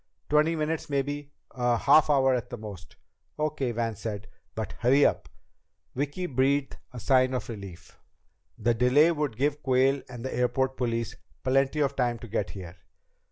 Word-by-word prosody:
"Twenty 155 +2 +3
minutes 155 0 -2
maybe. 145 +1 -2 0.2
A 120 -2 +1
half 155 +6 +5
hour 135 -2 +4
at 125 -3 -2
the 120 - -6
most." 100 -4 -10 0.4
"Okay," 150 -4 -1
Van 115 -1 -2
said. 105 -1 -5 0.3
"But 110 -3 -4
hurry 135 +5 +4
it - - +7
up." - - 0 0.6
Vicki 145 +7 -2
breathed 135 -1 0
a 125 - -10
deep - - -6
sigh 130 -2 +5
of 125 -1 -3
relief. 100 -6 -10 0.6
The 120 - +1
delay 125 +8 +4
would 150 -8 -2
give 145 +2 0
Quayle 135 +1 +2
and 125 0 -8
the 130 - -3
airport 125 +2 0
police 115 -2 -2 0.3
plenty 135 +3 +2
of 140 -1 +1
time 120 -2 0
to 120 - -10
get 110 - -2
here! 90 -2 -9
130 Hz, 170 wpm, -27 LUFS, 120-145 Hz, 0.6 s, it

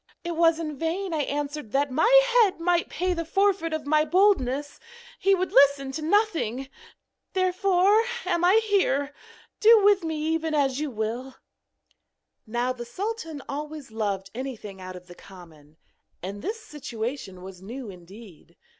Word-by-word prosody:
It 345 -1 -4
was 330 -1 +4
in 305 -4 -5
vain 340 +3 -2
I 310 - 0
answered 290 -3 -4
that 280 0 +1
my 315 - +2 0.2
head 440 -8 +4
might 345 0 +1
pay 360 +3 -1
the 335 -1 -3
forfeit 380 -1 +1
of 315 -2 -3
my 305 +1 +3
boldness, 295 -6 +1 0.4
he 390 0 +4
would 370 0 -2
listen 275 0 +4
to 300 +4 -5
nothing. 315 - 0 0.6
Therefore 375 +3 +3 0.2
am 350 -2 0
I 385 +5 +5
here; 295 -9 +1 0.5
do 440 -1 +7
with 405 -2 +4
me 320 -1 -2 0.2
even 320 -1 -1
as 275 -2 +1
you 305 -1 -2
will!' 240 +3 -4 1.1
Now 240 +3 -1
the 240 -1 -7
sultan 325 - -5
always 295 -2 -6
loved 200 -3 -3
anything 220 -6 -7
out 185 0 -8
of 180 0 -11
the 175 - -12
common, 160 -5 -16 0.5
and 200 +2 -6
this 445 +3 -4
situation 245 - -6
was 185 -1 -10
new 230 +2 -7
indeed. 180 -2 -15
295 Hz, 155 wpm, -26 LUFS, 235-360 Hz, 1.1 s, do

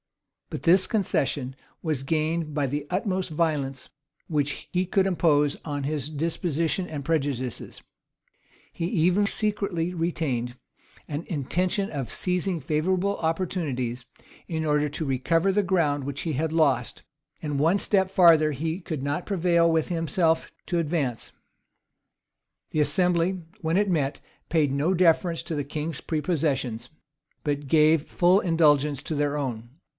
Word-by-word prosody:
[] - - -58
But - - -5
this 180 +3 +5
concession 140 - -1 0.3
was 155 -5 -1
gained 155 +1 -1
by 145 -2 +1
the 145 +2 -3
utmost 185 -1 -1
violence 150 -5 -1 0.4
which 150 -2 -2
he 180 +1 +1
could 190 +1 +2
impose 150 -6 +2
on 145 -2 -3
his 145 0 -2
disposition 165 +3 -1
and 145 -5 -6
prejudices: 135 -7 -2 0.9
he 165 - -3
even 180 +2 +2
secretly 200 -5 -1
retained 145 -8 -2 0.5
an 150 +2 -4
intention 180 +6 -1
of 135 -5 -4
seizing 180 -1 -1
favorable 180 +7 0
opportunities, 155 -8 -2 0.4
in 160 -2 -2
order 150 -1 +2
to: 155 +2 -4
recover 165 +8 +1
the 205 +1 +2
ground 160 -7 +1
which 140 0 -4
he 160 - -2
had 155 +3 -1
lost.[] 140 -7 +1 0.4
And 145 -2 -2
one 165 +7 +3
step 190 -2 +2
farther 165 -5 +5
he 160 +6 -3
could 155 -6 -4
not 145 +5 -2
prevail 170 -3 +3
with 160 -1 +1
himself 165 -1 0
to 175 - 0
advance. 150 -7 -2 1.4
The 155 - +1
assembly, 175 +4 +1 0.2
when 165 +1 +1
it 205 0 +2
met, 145 -5 0 0.3
paid 155 -4 +2
no 155 +7 +1
deference 170 -1 +2
to 165 - -4
the 145 - -1
king's 150 +3 -4
prepossessions, 145 -7 -1 0.5
but 145 -1 -2
gave 155 +1 +4
full 180 +2 +4
indulgence 150 -6 +2
to 155 - -3
their 145 0 0
own. 120 -5 -4
160 Hz, 140 wpm, -26 LUFS, 145-175 Hz, 1.4 s, this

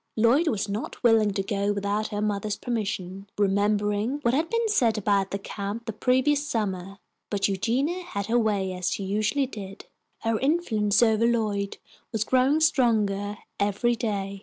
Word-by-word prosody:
Lloyd 240 +9 +3
was 215 -7 0
not 205 +6 -5
willing 225 -3 +5
to 195 -1 -1
go 200 +1 0
without 205 +1 -1
her 205 -1 -3
mother's 210 0 -1
permission, 195 -4 -4
remembering 205 +4 +1
what 235 - +2
had 315 +5 +1
been 460 0 +1
said 235 - +2
about 200 -2 +1
the 200 - -2
camp 200 +3 -5
the 225 - -4
previous 260 +6 +2
summer, 195 -7 -3 0.3
but 200 -1 +1
Eugenia 250 - 0
had 200 - -4
her 235 +3 +2
way 200 -4 0
as 180 -1 -1
she 200 - -3
usually 215 +8 0
did. 200 -6 -9 0.4
Her 225 -1 0
influence 240 -9 +2
over 225 0 +3
Lloyd 210 -4 -1 0.3
was 220 -1 0
growing 260 +6 +3
stronger 210 -8 +2 0.2
every 205 +4 +1
day. 200 -3 -3
215 Hz, 160 wpm, -26 LUFS, 200-240 Hz, 0.4 s, willing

